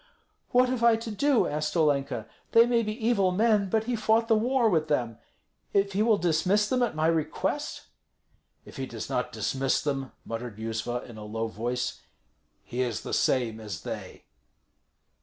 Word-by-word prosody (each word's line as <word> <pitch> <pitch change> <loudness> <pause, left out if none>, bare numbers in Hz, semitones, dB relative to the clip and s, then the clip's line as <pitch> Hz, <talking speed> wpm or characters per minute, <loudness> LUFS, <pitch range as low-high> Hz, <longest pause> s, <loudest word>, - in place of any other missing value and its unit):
"What 250 +1 +4
have 250 -2 -1
I 235 -1 +6
to 225 0 -5
do?" 275 +4 +2
asked 150 +3 -2
Olenka. 140 -7 +1 0.3
"They 230 0 +8
may 240 -1 +2
be 220 +1 -3
evil 200 -6 +3
men, 210 0 +2
but 220 +3 +1
he 240 +1 -1
fought 225 +1 +2
the 225 - +4
war 240 +2 +2
with 160 -6 +2
them. 120 -7 -1 0.5
If 200 0 +2
he 200 - +1
will 220 -1 +4
dismiss 180 +5 +2
them 250 +3 +1
at 235 -9 0
my 155 0 0
request?" 160 -2 -1 0.8
"If - - -12
he - - -3
does - - -7
not - - -1
dismiss 135 0 0
them," 135 -3 -3
muttered 115 -1 -5
Yuzva, 115 +2 -3
in 120 -3 -11
a - - -8
low 110 +2 -3
voice, 120 +3 -3 0.6
"he 125 - -3
is 120 -4 -1
the - - -6
same 115 -4 +1
as 105 -7 -6
they." - - -7
165 Hz, 175 wpm, -27 LUFS, -, 0.8 s, They